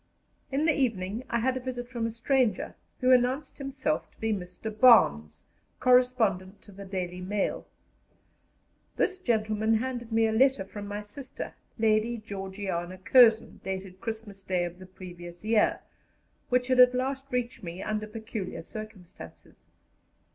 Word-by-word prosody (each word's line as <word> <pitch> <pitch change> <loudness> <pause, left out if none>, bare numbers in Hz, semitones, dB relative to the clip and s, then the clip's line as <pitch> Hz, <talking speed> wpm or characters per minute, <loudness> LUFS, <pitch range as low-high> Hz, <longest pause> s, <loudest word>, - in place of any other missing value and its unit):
In 280 +3 +1
the 315 - +4
evening 225 -5 -1
I 235 - +1
had 260 +2 +1
a - - -2
visit 245 -1 -5
from 235 -2 -2
a - - -4
stranger, 230 -2 0 0.3
who 255 0 +4
announced 255 +5 +2
himself 260 - -2
to - - -32
be 225 -1 0
Mr. 195 +3 -6
Barnes, 75 - +5 0.4
correspondent 230 -7 +3
to 205 - -15
the 200 +1 -10
Daily 180 -2 -4
Mail. 200 +2 -2 1.3
This 375 -1 0
gentleman 220 - +1
handed 240 0 -3
me 225 0 +3
a 220 - +1
letter 255 -2 +3
from 205 +1 -8
my 205 +1 -5
sister, 255 +6 -8 0.2
Lady 225 +1 +2
Georgiana 190 -4 -5
Curzon, 225 +3 +5
dated 190 -1 -5
Christmas 220 -3 -6
Day 185 -2 0
of 175 +1 -8
the 185 - -11
previous 175 -1 -11
year, 220 -1 +2 0.7
which 250 0 +2
had 255 -1 +3
at 250 0 +8
last 270 +2 -2
reached 250 -1 -2
me 175 +1 -6
under 215 0 -2
peculiar 215 -5 -6
circumstances. 180 - -11
220 Hz, 145 wpm, -28 LUFS, 190-250 Hz, 1.3 s, at